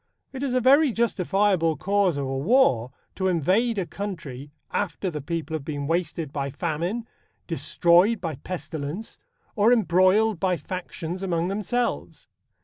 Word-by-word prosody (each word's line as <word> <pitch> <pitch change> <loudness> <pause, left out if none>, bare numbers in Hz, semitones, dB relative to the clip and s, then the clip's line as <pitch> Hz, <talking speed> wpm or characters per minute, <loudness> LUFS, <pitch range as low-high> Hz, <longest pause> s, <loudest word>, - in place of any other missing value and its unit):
It 265 - -6
is 265 -3 -1
a - - +4
very 275 +3 +5
justifiable 195 -6 +1
cause 195 -4 +1
of 140 - -2
a 135 0 -2
war 140 - +3 0.2
to 190 - -1
invade 190 - +2
a 190 - 0
country 155 -9 -6 0.2
after 185 -1 -2
the 150 -2 -5
people 160 +1 -4
have 155 -3 -3
been 145 -1 -4
wasted 165 -2 -2
by 140 -2 -2
famine, 170 - -3 0.4
destroyed 180 +6 +3
by 165 -6 -4
pestilence 165 +3 -6 0.4
or 215 +1 +4
embroiled 200 -1 +3
by 185 0 +1
factions 175 +2 -6
among 175 -2 -1
themselves. 215 +5 -2
180 Hz, 140 wpm, -25 LUFS, 160-210 Hz, 0.4 s, very